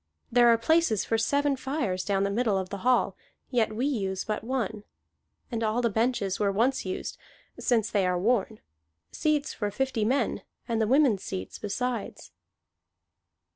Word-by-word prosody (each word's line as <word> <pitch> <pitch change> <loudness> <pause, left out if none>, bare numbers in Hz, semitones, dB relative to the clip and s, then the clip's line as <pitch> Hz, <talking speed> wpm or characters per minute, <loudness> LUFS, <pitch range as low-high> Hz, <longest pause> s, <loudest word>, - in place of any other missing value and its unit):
There 240 0 +6
are 230 -1 +6
places 255 - +2
for 225 - +1
seven 285 +4 +2
fires 260 -9 -2
down 195 -1 +1
the 200 - 0
middle 215 -2 +1
of 190 -1 -3
the 200 - -5
hall, 245 -4 +2 0.4
yet 230 -4 +2
we 245 +4 0
use 195 -9 -1
but 215 0 -3
one. 225 -4 -2 0.7
And 230 -1 -2
all 220 +1 +1
the 235 -2 +1
benches 220 -3 0
were 205 -1 +2
once 230 +2 +1
used, 185 - -4 0.4
since 225 -3 +1
they 195 -3 +2
are 180 0 +1
worn: 215 +2 0 0.5
seats 300 -1 0
for 205 - -2
fifty 260 0 -1
men, 255 +6 0 0.3
and 230 -2 0
the 220 - +2
women's 255 -6 +4
seats 95 0 -6
besides." 240 +4 -4
225 Hz, 165 wpm, -27 LUFS, 200-255 Hz, 0.7 s, There